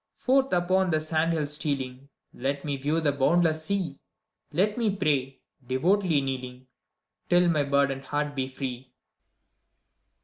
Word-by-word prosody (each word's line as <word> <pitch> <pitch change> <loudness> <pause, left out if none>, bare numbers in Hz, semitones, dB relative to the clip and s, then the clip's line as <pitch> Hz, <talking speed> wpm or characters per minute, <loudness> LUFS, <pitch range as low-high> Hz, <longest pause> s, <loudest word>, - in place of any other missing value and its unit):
Forth 265 +1 +2
upon 185 +1 +2
the 155 -2 +2
sand 155 +1 0
hills 150 -3 0
stealing, 135 -3 -3 0.2
Let 140 +3 -3
me 145 -1 -1
view 145 +4 0
the 150 -2 +2
boundless 155 +3 +2
sea! 185 -7 -2 0.5
Let 205 +4 +1
me 230 -3 +1
pray, 140 -8 0 0.2
devoutly 160 +5 +2
kneeling. 130 -1 -5 0.6
Till 175 0 +5
my 155 -3 +2
burdened 140 -1 +1
heart 145 0 -2
be 130 -1 -1
free! 130 -1 -7
145 Hz, 135 wpm, -27 LUFS, 135-175 Hz, 0.6 s, Till